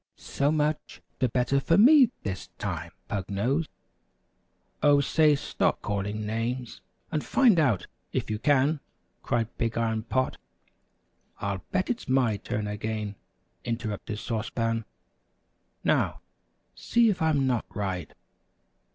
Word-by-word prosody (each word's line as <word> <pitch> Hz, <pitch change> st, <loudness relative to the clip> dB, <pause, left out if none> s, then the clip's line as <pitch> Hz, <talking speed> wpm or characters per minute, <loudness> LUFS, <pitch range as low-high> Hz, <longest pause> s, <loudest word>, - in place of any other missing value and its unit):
"So 140 Hz, +1 st, 0 dB
much 155 Hz, 0 st, -1 dB, 0.2 s
the 130 Hz, -, +2 dB
better 125 Hz, +4 st, +2 dB
for 165 Hz, +5 st, +2 dB
me 260 Hz, +3 st, +8 dB
this 95 Hz, -2 st, -4 dB
time, 85 Hz, -4 st, -4 dB, 0.2 s
Pug 100 Hz, -4 st, -3 dB
Nose." 130 Hz, +11 st, 0 dB, 1.1 s
"Oh, 145 Hz, -1 st, +6 dB
say, 150 Hz, +1 st, +4 dB
stop 140 Hz, -, -1 dB
calling 105 Hz, +1 st, -2 dB
names, 115 Hz, +3 st, -3 dB, 0.3 s
and 155 Hz, -2 st, -1 dB
find 235 Hz, -10 st, +4 dB
out 120 Hz, -, +2 dB, 0.3 s
if -, -, -1 dB
you 105 Hz, -1 st, -2 dB
can," 145 Hz, +3 st, +3 dB, 0.4 s
cried 115 Hz, -1 st, -1 dB
Big 115 Hz, -1 st, -1 dB
Iron 110 Hz, -1 st, 0 dB
Pot. 130 Hz, +3 st, -1 dB, 1.0 s
"I'll 100 Hz, -2 st, -3 dB
bet 185 Hz, +5 st, +1 dB
it's 240 Hz, -, -5 dB
my 125 Hz, -5 st, +3 dB
turn 105 Hz, +1 st, -3 dB
again!" 105 Hz, 0 st, -3 dB, 0.5 s
interrupted 110 Hz, -3 st, -3 dB
Sauce 115 Hz, +1 st, -3 dB
Pan. 115 Hz, -1 st, -1 dB, 1.0 s
"Now, -, -, +1 dB, 0.5 s
see 235 Hz, -1 st, +3 dB
if 185 Hz, -, -4 dB
I'm 155 Hz, -4 st, +2 dB
not 125 Hz, -3 st, 0 dB
right." 95 Hz, -6 st, -3 dB
120 Hz, 125 wpm, -27 LUFS, 105-145 Hz, 1.1 s, me